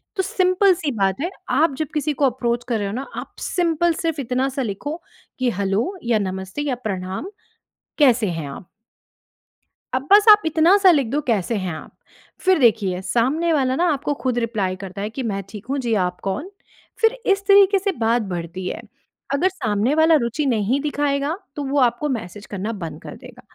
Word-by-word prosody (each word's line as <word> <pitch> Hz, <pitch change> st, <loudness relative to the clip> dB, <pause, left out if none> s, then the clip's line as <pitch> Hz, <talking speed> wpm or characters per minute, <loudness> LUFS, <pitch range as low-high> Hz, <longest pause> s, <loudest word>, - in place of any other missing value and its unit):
तो 380 Hz, -, 0 dB
सिंपल 370 Hz, +1 st, +3 dB
सी 310 Hz, -4 st, -3 dB
बात 195 Hz, +1 st, +1 dB
है 345 Hz, -, -1 dB, 0.2 s
आप 290 Hz, +3 st, +3 dB
जब 310 Hz, -2 st, -2 dB
किसी 300 Hz, 0 st, 0 dB
को 285 Hz, -, +1 dB
अप्रोच 240 Hz, -2 st, 0 dB
कर 235 Hz, -2 st, 0 dB
रहे 205 Hz, -, -2 dB
हो 200 Hz, -, -4 dB
ना 265 Hz, +4 st, -4 dB
आप -, -, -7 dB
सिंपल 340 Hz, -1 st, +1 dB
सिर्फ़ 320 Hz, -3 st, -1 dB
इतना-सा 260 Hz, +2 st, -1 dB
लिखो 290 Hz, -, -4 dB, 0.4 s
कि 255 Hz, -1 st, +2 dB
हैलो 200 Hz, -, -1 dB
या 235 Hz, -2 st, +2 dB
नमस्ते 190 Hz, +6 st, -4 dB
या 255 Hz, -, 0 dB
प्रणाम, 190 Hz, -, -4 dB, 0.7 s
कैसे 250 Hz, -7 st, +4 dB
हैं 160 Hz, -4 st, -4 dB
आप। 155 Hz, +5 st, -10 dB, 1.3 s
अब 260 Hz, +2 st, -2 dB
बस 410 Hz, 0 st, +8 dB
आप 420 Hz, 0 st, +9 dB
इतना-सा 355 Hz, +5 st, +5 dB
लिख 280 Hz, -7 st, +2 dB
दो 290 Hz, +6 st, -1 dB
कैसे 225 Hz, -1 st, 0 dB
हैं 185 Hz, -5 st, -3 dB
आप, -, -, -10 dB, 0.5 s
फ़िर 375 Hz, -3 st, +3 dB
देखिए 205 Hz, -6 st, +2 dB
सामने 270 Hz, -, +1 dB
वाला 260 Hz, -3 st, +1 dB
ना 345 Hz, +5 st, +1 dB
आपको 285 Hz, +1 st, -2 dB
ख़ुद 250 Hz, -2 st, 0 dB
रिप्लाई 215 Hz, -6 st, -1 dB
करता 195 Hz, +1 st, -8 dB
है 210 Hz, -, -2 dB
कि 255 Hz, +3 st, -5 dB
मैं 200 Hz, -3 st, -2 dB
ठीक 210 Hz, +1 st, -9 dB
हूँ 275 Hz, -, 0 dB
जी, 240 Hz, -3 st, -1 dB
आप 180 Hz, -3 st, 0 dB
कौन? 195 Hz, -, -3 dB, 0.5 s
फ़िर 450 Hz, +2 st, +3 dB
इस 395 Hz, 0 st, 0 dB
तरीक़े 395 Hz, 0 st, +6 dB
से 395 Hz, +1 st, 0 dB
बात 230 Hz, +1 st, +2 dB
बढ़ती 175 Hz, +2 st, -5 dB
है। -, -, -4 dB, 0.5 s
अगर 360 Hz, +7 st, +2 dB
सामने 230 Hz, -, 0 dB
वाला 320 Hz, +1 st, +5 dB
रुचि 235 Hz, +6 st, -1 dB
नहीं 235 Hz, 0 st, +1 dB
दिखाएगा 290 Hz, +1 st, -1 dB, 0.2 s
तो 290 Hz, -, -3 dB
वो 275 Hz, +2 st, -1 dB
आपको 245 Hz, +3 st, +2 dB
मैसेज 210 Hz, -4 st, -5 dB
करना 205 Hz, +2 st, -4 dB
बंद 170 Hz, -7 st, -7 dB
कर -, -, -9 dB
देगा, -, -, -14 dB
255 Hz, 190 wpm, -21 LUFS, 205-315 Hz, 1.3 s, आप